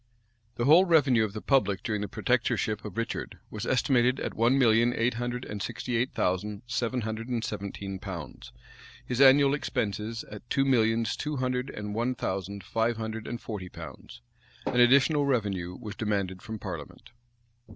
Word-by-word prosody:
The 120 - -1
whole 165 +7 +7
revenue 145 -9 +4
of 105 -2 -3
the 110 - -6
public 105 -9 +2
during 105 -3 -1
the 105 - -2
protectorship 105 +3 0
of 105 -2 -8
Richard 115 - -3
was 110 +2 -5
estimated 125 -1 +3
at - - -3
one 120 +4 +3
million 120 -1 +4
eight 120 +2 +1
hundred 120 +1 -3
and 105 -1 -6
sixty 120 +5 -3
eight 120 +3 +1
thousand 100 +3 -1
seven 120 +2 -1
hundred 110 +1 -4
and 120 -2 -1
seventeen 100 -2 -5
pounds; 95 -5 -8 0.5
his 125 +1 -1
annual 140 +1 +7
expenses 115 -5 -2
at 105 +3 -11
two 135 - +2
millions 115 -3 +2
two 150 0 -3
hundred 125 0 -1
and 105 0 -5
one 120 +4 0
thousand 100 -1 -4
five 115 +2 0
hundred 110 0 -5
and 120 0 -5
forty 100 -5 -6
pounds. 75 -8 -10 0.4
An 125 - +1
additional 140 +4 +5
revenue 100 -8 -1
was 105 - -6
demanded 100 -4 -2
from 110 -2 -6
parliament. 95 +4 -8
115 Hz, 170 wpm, -28 LUFS, 105-125 Hz, 0.5 s, whole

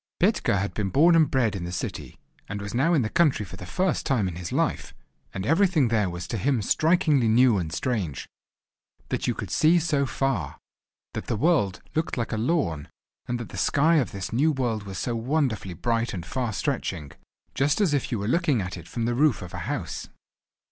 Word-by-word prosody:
Petka 185 - +2
had 100 +1 -2
been 100 -3 -2
born 165 - +5
and 160 -3 +4
bred 120 -7 +1
in 95 - -4
the 85 - -4
city, 85 - -5 0.3
and 105 - -4
was 100 0 -6
now 155 +8 +3
in 140 - +3
the - - 0
country 140 -10 +2
for 90 - -10
the 90 - -9
first 185 - 0
time 120 -9 +1
in 90 - -5
his 90 0 -6
life, - - -1 0.4
and 95 0 -5
everything 165 - +3
there 105 -4 +1
was 85 0 -6
to 115 - -3
him 130 -1 +1
strikingly 155 - +3
new 115 -1 +4
and 80 -3 -4
strange; 85 - -2 0.8
that - - -2
you - - 0
could - - -6
see 160 +3 +4
so 150 -4 +1
far; 100 - -2 0.6
that - - -5
the 115 - -1
world 105 - +2
looked 160 -2 -1
like 115 - -2
a 110 - -1
lawn; 110 - -1 0.4
and 120 0 -2
that 120 - -7
the - - -8
sky 160 +3 +3
of 135 - +1
this 100 +2 -5
new 145 +7 +3
world 120 -7 -2
was 95 -2 -6
so 120 +5 -2
wonderfully 115 - -1
bright 115 +3 -1
and 85 -3 -6
far 120 +6 -2
stretching—just 125 - -3
as 190 -8 +2
if 140 - -1
you 120 - 0
were 100 0 -3
looking 150 -2 +2
at 95 -1 -4
it 85 -1 -11
from 115 -2 -3
the 120 - 0
roof 140 -3 +2
of 90 - -10
a - - -5
house! - - -4
120 Hz, 210 wpm, -25 LUFS, 100-150 Hz, 0.8 s, born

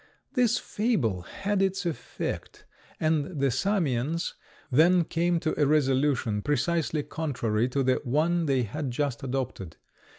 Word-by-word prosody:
This 245 -3 +3
fable 155 - 0
had 200 - -2
its 195 -1 0
effect, 170 -3 -5 0.3
and 155 0 0
the 135 -1 +2
Samians 160 - 0 0.4
then 170 +6 +5
came 170 +1 0
to 155 - 0
a 145 - +4
resolution 135 -6 +2
precisely 155 +2 0
contrary 125 -8 -1
to 135 +2 0
the 130 0 +2
one 160 +6 +1
they 135 -3 +2
had 135 +6 -4
just 130 0 -2
adopted. 125 -9 -4
150 Hz, 130 wpm, -27 LUFS, 130-170 Hz, 0.4 s, then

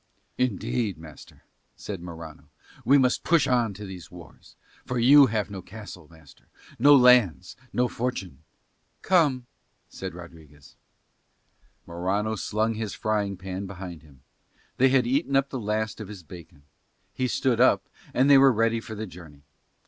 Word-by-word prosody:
"Indeed, 115 -4 -1
master," 80 -2 -14 0.3
said 100 -4 -7
Morano, 85 -2 -10 0.3
"we 140 +5 +5
must 130 -2 +1
push 165 -4 +3
on 120 -6 +1
to 105 +2 -8
these 90 -4 -10
wars; 85 -2 -15 0.3
for 125 - -4
you 135 +4 +7
have 105 -3 -2
no 95 -2 -6
castle, 95 -5 -11
master, 80 -4 -19 0.3
no 145 +4 +7
lands, 125 - +4 0.2
no 125 0 +1
fortune 115 - -4 0.3
..." - - -46
"Come," 145 -9 +2 0.4
said 95 -2 -7
Rodriguez. 80 -5 -14 1.1
Morano 95 +6 -2
slung 110 +1 -1
his 110 -2 -5
frying 105 -3 -2
pan 95 +1 -6
behind 90 -4 -9
him: 70 -4 -21 0.5
they 130 +1 +4
had 130 -2 +3
eaten 140 +3 0
up 135 0 +2
the 130 - -4
last 110 0 -3
of 105 - -7
his 100 -3 -10
bacon: 85 -2 -14 0.5
he 130 - -1
stood 125 -1 0
up, 130 - +3 0.2
and 130 +2 +2
they 140 -1 +7
were 135 0 +6
ready 115 0 +1
for 110 -1 -9
the 110 +1 -5
journey. 80 -7 -14
105 Hz, 155 wpm, -25 LUFS, 90-125 Hz, 1.1 s, you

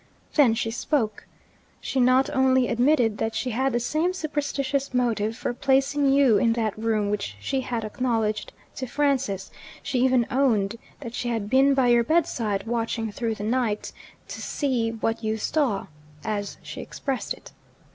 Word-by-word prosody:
Then 260 -7 +5
she 225 -1 -1
spoke. 230 -3 -1 0.5
She 270 - -2
not 255 +2 +4
only 260 -1 +3
admitted 240 -3 +2
that 225 0 -1
she 250 +3 -1
had 265 +4 +1
the 240 - +1
same 310 +9 0
superstitious 280 -4 -2
motive 225 -3 0
for 245 - -2
placing 275 +2 +2
you 270 -7 +5
in 230 0 +3
that 220 -3 -1
room 215 -2 0
which 200 - -3
she 265 - -1
had 235 -3 -3
acknowledged 220 -2 -1 0.3
to 260 - -3
Francis 260 -8 0 0.3
she 260 - -1
even 255 -2 +3
owned 230 -6 +2 0.2
that 235 -4 -7
she 240 - -2
had 220 -3 -2
been 270 +1 +5
by 260 -2 +3
your 240 0 +5
bedside, 230 -9 0
watching 225 -1 -2
through 225 +1 -2
the 205 - -6
night, 225 -2 -1 0.4
"to - - -6
see 255 -6 0
what 225 0 -2
you 220 0 0
saw," 245 -4 0 0.4
as 205 -2 -3
she - - -7
expressed 270 -3 -4
it. - - -15
240 Hz, 165 wpm, -25 LUFS, 220-270 Hz, 0.5 s, Then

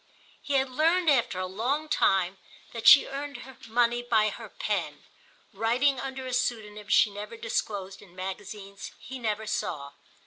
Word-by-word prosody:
He 285 - -4
had 265 -1 +1
learned 325 +4 +3
after 240 -7 +1
a 185 - -1
long 245 +11 -2
time 190 -9 +2 0.3
that 230 -1 -2
she 285 - +10
earned 280 -1 -6 0.3
money 240 +1 +2
by 220 -3 +2
her - - -9
pen, - - -3 0.5
writing 245 +6 +2
under 265 0 -5
a 255 - -4
pseudonym 215 -4 -2
she 205 0 +4
never 210 +3 -8
disclosed 200 -4 -3
in 185 -4 -17
magazines 195 +1 -7
he 260 0 -9
never 220 -2 -2
saw. 145 -9 -3
225 Hz, 150 wpm, -28 LUFS, 200-260 Hz, 0.5 s, she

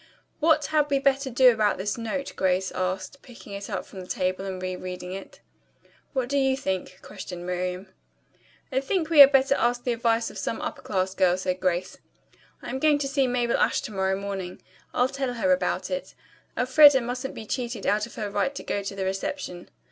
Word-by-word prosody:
"What 315 -1 +3
had 300 -1 +1
we 280 - +3
better 275 0 +1
do 255 +1 +6
about 215 -2 +1
this 200 +2 -2
note?" 235 +4 -4
Grace 185 0 +1
asked, 185 +8 -3
picking 235 -5 -12
it 200 0 -6
up - - -3
from 190 - -11
the 180 - -10
table 185 +1 -1
and 190 -1 -4
re 185 0 -3
reading 180 0 -6
it. 195 0 -9 0.7
"What 260 -3 0
do 280 +2 +1
you 265 -1 +2
think?" 185 -5 -3
questioned 175 -1 -8
Miriam. 180 +1 -3 0.9
"I 260 - +2
think 320 +3 -1
we 315 - +5
had 280 -1 +11
better 270 0 +4
ask 245 -2 0
the 245 - 0
advice 230 0 0
of - - -8
some - - -3
upper - - -5
class 190 -2 -1
girl," 180 -1 +3
said 185 0 -2
Grace. 180 -1 -1 0.6
"I'm 265 - -4
going 300 0 +4
to 285 -1 -2
see 275 -1 +1
Mabel 245 -1 +1
Ashe - - +2
to - - -7
morrow 190 0 0
morning. 195 -2 -5 0.3
I'll 250 - +2
tell 265 -2 -3
her 275 +4 +3
about 275 - -1
it. - - -4 0.4
Elfreda 270 +2 +7
mustn't 250 +2 -4
be 220 - -7
cheated 235 -3 -4
out 210 +2 +1
of - - -14
her 215 - -3
right 205 +7 0
to - - -6
go 200 - -2
to 195 0 -6
the 190 -1 -3
reception." 190 -1 -4
230 Hz, 205 wpm, -26 LUFS, 190-270 Hz, 0.9 s, had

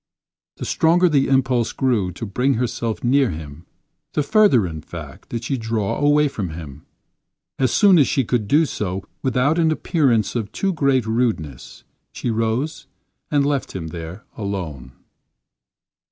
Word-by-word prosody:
The - - -5
stronger 175 +3 +3
the 145 -5 +2
impulse 130 -3 +2
grew 115 -9 +1
to 105 - -6
bring 125 +7 +1
herself 115 -1 -2
near 130 +1 +3
him, 80 0 -8 0.5
the 150 - +1
further, 200 - +4
in 80 -3 -5
fact, - - -10
did 115 -1 -4
she 130 +1 -2
draw 110 -3 -2
away 145 +1 +4
from 105 -10 -4
him. 80 -4 -9 0.7
As 130 -3 +2
soon 195 -5 +5
as 140 - +5
she 135 - +1
could 115 -2 -1
do 155 +8 +4
so 95 -8 -3 0.2
without 135 +5 +1
an 160 -1 +3
appearance 140 - +1
of 110 -4 -2
too 195 -1 -1
great 135 -6 +2
rudeness, 110 - -2 0.3
she 120 - -3
rose 115 +7 -2 0.4
and 145 -2 +2
left 140 -2 -1
him 80 -4 -4
there 85 +6 -8
alone. 85 - -5
120 Hz, 155 wpm, -21 LUFS, 100-140 Hz, 0.7 s, soon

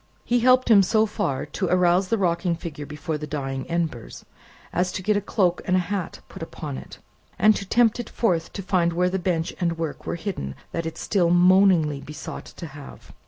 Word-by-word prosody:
He 245 0 +2
helped 255 0 +4
him 205 -3 +8
so 215 +3 +3
far 205 -10 -2
to 180 +5 -3
arouse 180 +1 +3
the 225 - +1
rocking 170 -2 +1
figure 155 -3 -7
before 150 +1 -4
the 150 - -5
dying 135 0 -4
embers, 165 -9 -3 0.5
as 180 +1 +1
to 185 - -4
get 210 +2 +2
a 205 - +1
cloak 185 -3 +1
and 185 0 +2
hat 185 0 -3
put - - -11
upon 65 - -6
it, 65 - -12 0.4
and 215 0 +5
to 195 - -5
tempt 235 -1 +3
it 240 - -5
forth 175 -8 0
to 195 - -5
find 175 -2 +1
where 180 +1 +1
the 190 - -1
bench 170 -3 -1
and 170 -2 0
work 165 -3 -5
were - - -1
hidden 170 - -5 0.2
that 165 -1 -3
it 165 - -6
still 180 -5 +1
moaningly 175 -4 +4
besought 150 0 -8
to 170 - -9
have. 145 -2 -12
175 Hz, 205 wpm, -24 LUFS, 160-195 Hz, 0.5 s, him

